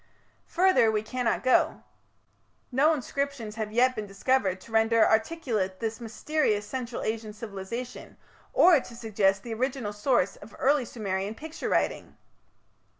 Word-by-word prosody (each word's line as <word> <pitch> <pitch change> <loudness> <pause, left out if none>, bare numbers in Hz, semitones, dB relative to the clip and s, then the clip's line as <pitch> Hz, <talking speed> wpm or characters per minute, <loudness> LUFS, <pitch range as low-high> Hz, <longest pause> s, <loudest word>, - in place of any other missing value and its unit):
Further 370 -11 +4
we 215 -1 0
cannot 250 +1 -1
go. 255 - +2 0.9
No 280 +5 +4
inscriptions 280 -5 -3
have 215 -1 -3
yet 255 +3 +3
been 210 -1 -4
discovered 195 -1 0
to 230 - -14
render 225 0 +4
articulate 220 - 0
this 225 0 -3
mysterious 225 -1 -1
Central 245 0 -5
Asian 220 -1 -3
civilization, 215 +3 -7 0.3
or 350 -5 +6
to 240 - -11
suggest 195 -4 +1
the 235 - -5
original 250 -2 -2
source 210 -2 +1
of - - -13
early 275 -1 +2
Sumerian 200 -2 -3
picture 315 +5 -6
writing. - - -1
230 Hz, 135 wpm, -27 LUFS, 210-260 Hz, 0.9 s, or